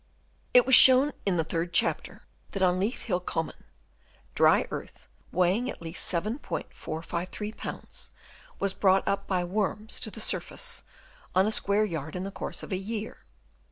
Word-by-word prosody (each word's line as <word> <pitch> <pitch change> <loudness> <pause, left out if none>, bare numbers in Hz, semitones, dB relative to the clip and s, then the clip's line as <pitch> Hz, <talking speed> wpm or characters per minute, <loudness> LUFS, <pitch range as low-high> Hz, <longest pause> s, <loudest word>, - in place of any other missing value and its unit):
It 250 - +8
was 265 - +1
shown 260 +3 +9 0.2
in 185 -3 +2
the 165 - +2
third 165 +2 -3
chapter - - 0 0.3
that 195 - -1
on 180 0 +3
Leith 210 +6 -2
Hill 180 -5 0
Common, 165 -2 -4 0.7
dry - - +4
earth - - -8 0.2
weighing 185 +8 +1
at - - -6
least 165 +1 -3
7*453 185 - -4
lbs. - - -7 0.5
was 200 -1 0
brought 190 -1 +3
up 200 0 -1
by 185 -2 0
worms 210 +4 -2
to 225 - 0
the 220 - -9
surface 475 - -1 0.5
on 190 +1 +5
a 215 - +1
square 210 0 +2
yard 160 -5 -5
in 180 - -3
the 195 - -5
course - - -6
of - - -9
a 185 - 0
year. 215 +3 -5
195 Hz, 160 wpm, -28 LUFS, 175-215 Hz, 0.7 s, shown